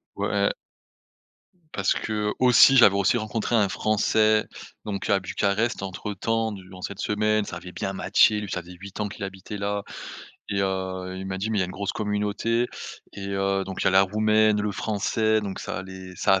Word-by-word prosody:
Ouais. - - +1 1.2
Parce 95 0 +1
que 105 -1 -2
aussi 130 +2 +7
j'avais 105 -5 +7
aussi 100 +4 +3
rencontré 110 +1 -1
un 105 -3 +4
français 110 +1 +2 0.4
donc, 100 -1 -4
à 100 -1 +4
Bucarest 100 +4 -1
entre 95 +2 -5
temps 115 +3 -1
durant 95 -1 -11
cette 100 +1 -6
semaine. 105 0 +1
Ça 85 - -6
avait 90 +1 -10
bien 95 - -4
matché, 105 +2 +3
lui 105 -2 -6
ça 90 - -3
faisait 90 +1 -13
8 100 +1 -9
ans 105 - 0
qu'il 100 - -8
habitait 95 +2 -6
là 100 0 -2 0.7
et 100 -1 -1
heu, 95 -1 -2
il 95 +1 -6
m'a 95 0 -4
dit: 105 +3 -2
«Mais 110 - 0
il - - +3
y - - +3
a - - +1
une - - -8
grosse 100 +1 -3
communauté» 105 +3 0 0.5
et 100 0 -6
heu, 95 0 0
donc 95 -1 -5
il - - -1
y - - +5
a - - +3
la 95 +1 +6
roumaine, 110 +1 +3
le 105 0 -1
français, 110 +1 0
donc 100 -2 -5
ça 85 - -4
les 95 -1 -10
ça - - +3
a 95 - +2
100 Hz, 205 wpm, -25 LUFS, 95-110 Hz, 1.2 s, aussi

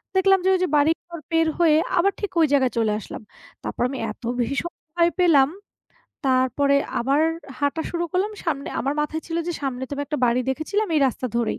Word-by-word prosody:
দেখলাম 385 0 +5
যে, - - +4
ওই - - 0
যে - - +2
বাড়িঘর 325 +3 +1
পার 325 0 +3
হয়ে 315 -3 +5 0.2
আবার 395 +3 +4
ঠিক 410 - -3
ওই - - +6
জায়গায় 265 -3 +3
চলে 220 -2 +2
আসলাম। - - -8 0.4
তারপর - - -5
আমি 270 - -5
এত 225 - -14 0.2
বেশি 240 +3 0
ভীষণ 345 +4 -3 0.2
ভয় 340 0 +4
পেলাম, 295 -6 +5 0.8
তারপরে 265 +2 +2 0.2
আবার 275 +5 +2 0.4
হাঁটা 285 +3 0
শুরু 345 0 -1
করলাম 395 +4 0
সামনে, 285 -4 -2
আমার 275 +4 -1
মাথায় 310 +2 -2
ছিল 330 0 -3
যে, 345 - -1
সামনে 260 -2 -3
তো - - -10
আমি 285 - -3
একটা 300 - -3
বাড়ি 240 +2 +2
দেখেছিলাম 360 +10 -1
এই 300 - +3
রাস্তা 255 0 -2
ধরেই। 235 -2 0
295 Hz, 200 wpm, -23 LUFS, 265-340 Hz, 0.8 s, ওই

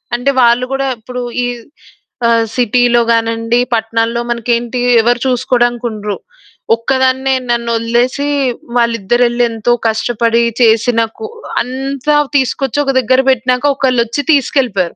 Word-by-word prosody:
అంటే 245 +3 0
వాళ్ళు 240 +1 +3
గూడా 270 0 -1
ఇప్పుడు 250 +3 -7 0.2
ఈ - - 0 0.8
ఆహ్, 230 -1 +3
సిటీ‌లో 245 0 +2
గానిండి, 230 +1 0
పట్నాల్లో 230 +1 -1
మనకేంటి 235 +1 -1 0.2
ఎవరు 240 +2 +1
చూసుకోడానికుండరు. 240 -4 -1 0.6
ఒక్కదాన్నే 260 +2 0
నన్నొదిలేసి 235 +3 0 0.5
వాల్లిద్దరెళ్లి 240 +1 +1
ఎంతో 225 +1 -1 0.2
కష్టపడి 230 +1 0 0.2
చేసిన 230 +1 +3 0.2
కూ 445 - -6 0.4
అంతా 270 +3 -2 0.2
తీసుకొచ్చి 270 +1 -1
ఒక 275 - 0
దగ్గర 255 +1 +2
పెట్టినాక 255 +1 +1
ఒకళ్ళొచ్చి 250 -1 0
తీసుకెళ్ళిపోయారు. 250 - 0
240 Hz, 105 wpm, -14 LUFS, 230-255 Hz, 0.8 s, వాళ్ళు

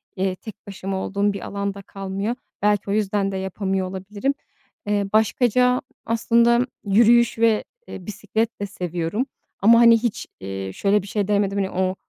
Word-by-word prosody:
eee, 190 -1 -1
tek 215 +2 -10
başıma 195 -1 -4
olduğum 200 +2 0
bir 200 - -6
alan 200 0 -3
da 200 - -9
kalmıyor. 195 +4 -4 0.3
Belki 205 0 +1
o 200 - +1
yüzden 200 -1 0
de 190 - -3
yapamıyor 190 0 -2
olabilirim. 200 +8 -2 0.5
Eee, 205 -1 +1
başkaca 250 +2 +3 0.2
aslında 235 +2 +3 0.2
yürüyüş 235 +4 +4
ve, 225 -2 +3 0.2
eee, 185 - -9
bisiklet 220 +2 -3
de - - 0
seviyorum 180 +3 -3 0.3
ama, 230 +4 +6
hani, 235 -1 +7
hiç, 230 -1 -3
eee, 95 0 -5
şöyle 205 - +2
bir 195 - -11
şey 200 -1 -1
denemedim, 200 -1 +1
hani, 195 -1 0
o 185 0 0
200 Hz, 165 wpm, -22 LUFS, 190-225 Hz, 0.5 s, hani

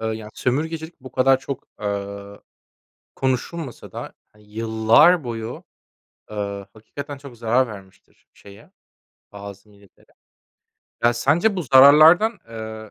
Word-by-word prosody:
eee, 110 - -3
yani, 110 -1 -5
sömürgecilik 160 +5 -3
bu 130 0 -12
kadar 130 +1 +3
çok, 135 -1 -7
eee, 100 0 -5 0.8
konuşulmasa 130 +2 -4
da, - - -7 0.2
eee, 105 - -21
yıllar 110 +9 +3
boyu, 115 0 -6 0.7
eee, 100 -2 -5
hakikaten 140 +6 -9
çok 135 -4 -13
zarar 120 +3 +1
vermiştir 95 -3 -15
şeye, 100 0 -17 0.6
bazı 100 0 -11
milletlere. 100 -2 -24 0.9
Ya, 120 - +5
sence 160 - +1
bu 180 - -2
zararlardan, 155 - +6
eee, 110 -1 -8
115 Hz, 115 wpm, -22 LUFS, 105-140 Hz, 0.9 s, zararlardan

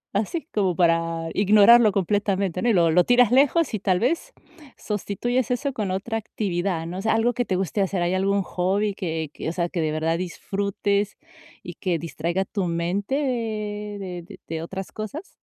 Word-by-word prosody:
Así, 280 - -1
como 190 -4 +1
para 165 -1 +1
ignorarlo 215 +3 +6
completamente, 195 -1 0
¿no? 240 - +2
Y 230 - +4
lo 170 -3 +4
lo 180 +2 +5
tiras 245 -2 +4
lejos 285 +2 +3
y, 215 - -1
tal 185 -1 +1
vez, 335 - -1 0.4
sustituyes 220 +4 -2
eso 265 +2 -1
con 210 -5 -2
otra 220 +4 -2
actividad, 180 -5 -2
¿no? 180 +3 -5
O - - -3
sea, 220 - +1
algo 240 +2 +2
que 245 0 -1
te 185 - -1
guste 190 +2 -1
hacer. 190 -2 0
¿Hay 175 - 0
algún 195 +1 +1
hobby 195 +4 0
que 160 -6 -4
que, - - -4
o - - -2
sea, 170 0 -1
que 170 - -2
de 155 - 0
verdad 160 +2 0
disfrutes 200 +2 -2 0.5
y - - -7
que 180 -4 -1
distraiga 170 +3 -2
tu 195 -2 -2
mente 175 +8 -1
de 210 - -3
de - - -12
de 160 0 -4
otras 190 +3 -6
cosas? 280 - -7
195 Hz, 185 wpm, -24 LUFS, 175-215 Hz, 0.5 s, ignorarlo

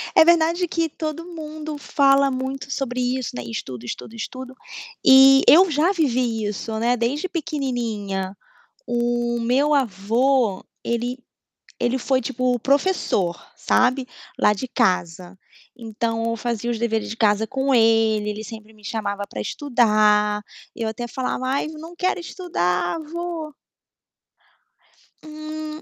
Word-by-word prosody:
É - - +9
verdade 340 +1 +3
que 330 -1 -1
todo 310 +2 -5
mundo 310 -1 -6
fala 275 -1 +3
muito 265 +1 -4
sobre 255 -2 -2
isso, 250 - -2
né. 125 - -4
Estudo, 120 +1 -6
estudo, 220 - -7
estudo, 255 +3 -7 0.5
e 270 +1 +8
eu 365 +4 +8
já 315 +4 +2
vivi 250 - 0
isso, 210 +2 -4
né, 240 +2 +2
desde 270 +9 -1
pequenininha. 235 - -3 0.5
O 240 0 0
meu 260 +6 +2
avô, 230 -1 +1 0.2
ele 240 +2 -2 0.6
ele 245 +2 +1
foi, 260 +1 +1
tipo, 255 0 0
professor, 270 - +1 0.2
sabe, 255 +1 +2 0.3
lá 210 - +4
de 210 +5 -5
casa. 185 -6 -1 0.4
Então, 225 0 -3
eu 230 - -2
fazia 235 0 -2
os 230 - -3
deveres 225 -2 -1
de 225 - -6
casa 215 -1 +3
com 265 +3 -1
ele, 225 -2 +3
ele 210 +1 -5
sempre 220 0 -10
me 215 - -21
chamava 205 -3 -3
para 105 - -5
estudar. 210 - +2 0.3
Eu 225 - -3
até 220 +2 -4
falava: 255 +1 -3
"Ai, 275 +3 0
não 315 +2 -9
quero 365 +2 0
estudar 180 - -1
vô". 330 -1 -5 1.7
Hum. 310 0 -7
245 Hz, 135 wpm, -22 LUFS, 220-290 Hz, 1.7 s, É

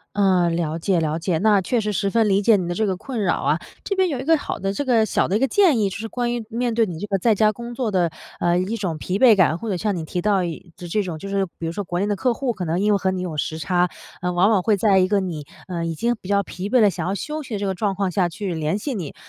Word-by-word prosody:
嗯， 185 -4 +3
了 160 -1 -2
解 180 +1 +1
了 155 0 -1
解。 170 -1 -1
那 205 +2 +4
确 225 +6 0
实 210 0 -2
十 200 0 0
分 225 0 +2
理 200 +1 +3
解 220 0 +5
你 180 - -2
的 175 - -2
这 220 +3 0
个 190 - -1
困 245 +4 -5
扰 185 - +2
啊。 150 +4 +1 0.2
这 395 - -1
边 380 -1 +2
有 280 -6 -2
一 260 - -5
个 325 +1 +4
好 - - -4
的 195 0 -2
这 200 - -3
个 235 -4 +3
小 - - +1
的 195 - +1
一 - - +3
个 270 - +4
建 345 - +4
议， 205 -3 +1
就 - - -6
是 225 - -5
关 240 +1 -2
于 235 -2 -4
面 240 0 -1
对 225 -1 +3
你 170 -3 -6
这 205 - -4
个 195 -2 0
在 225 +4 +3
家 215 +1 +3
工 235 +2 -8
作 235 -3 -1
的， 180 -4 +1 0.3
呃， 175 0 +2
一 190 +5 -1
种 180 -7 -3
疲 185 +5 -2
惫 235 -4 +7
感， 165 -3 +3
或 230 - -6
者 195 - 0
像 205 +3 -1
你 165 -3 -4
提 180 - -3
到 195 -1 +2
一 170 0 -6
就 175 - -8
这 210 +5 0
种 175 -5 -5
就 195 - -7
是 195 -1 0
比 165 - -4
如 165 - -2
说 205 +3 -4
国 175 0 -3
内 200 - +1
的 205 - 0
客 250 +5 +1
户， 255 0 -1
可 185 -5 -5
能 170 +2 -1
因 210 +1 +3
为 200 - +3
和 190 - 0
你 185 -1 -3
有 170 -4 -4
时 155 +2 -2
差， 180 +3 +1 0.3
呃， 180 0 0
往 180 +4 +3
往 200 -5 +3
会 215 0 +2
在 195 -1 +3
一 185 - +4
个 205 0 +2
你， 165 -6 -5 0.2
呃， 170 -2 -3
已 165 - -2
经 235 +8 0
比 185 - -11
较 200 0 +2
疲 185 +2 -6
惫 250 0 +4
了， 210 - +5
想 175 -2 -4
要 190 - -1
休 305 +9 -4
息 235 - -7
的 200 - -3
这 205 - -1
个 190 - -1
状 200 +1 -1
况 195 -1 -1
下， 180 0 +1
去 185 +1 -4
联 160 +4 -1
系 270 +5 -4
你。 180 -9 -5
195 Hz, 350 characters per minute, -22 LUFS, 175-220 Hz, 0.3 s, 惫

